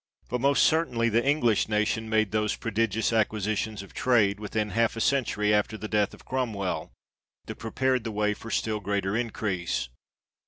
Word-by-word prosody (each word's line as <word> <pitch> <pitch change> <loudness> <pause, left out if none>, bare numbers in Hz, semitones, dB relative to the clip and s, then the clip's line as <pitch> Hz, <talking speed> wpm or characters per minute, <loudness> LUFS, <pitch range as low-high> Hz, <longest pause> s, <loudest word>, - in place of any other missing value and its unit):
But 125 -1 -2
most 140 +1 +4
certainly 125 -8 +2
the 115 +2 +2
English 130 -8 +2
nation 110 +1 0
made 110 -2 +2
those 105 -1 0
prodigious 110 0 0
acquisitions 110 -1 0
of 100 - -15
trade, 105 -5 +2
within 105 0 -2
half 115 +3 +1
a - - -4
century 110 -5 +1
after 105 +1 +1
the 110 +1 -6
death 105 -2 +1
of - - -19
Cromwell, 110 -8 -2 0.5
that - - -6
prepared 130 +2 0
the 115 - -4
way 105 0 +1
for 115 - -10
still 110 -1 -1
greater 100 0 -1
increase. 95 - -2
110 Hz, 165 wpm, -27 LUFS, 105-115 Hz, 0.5 s, most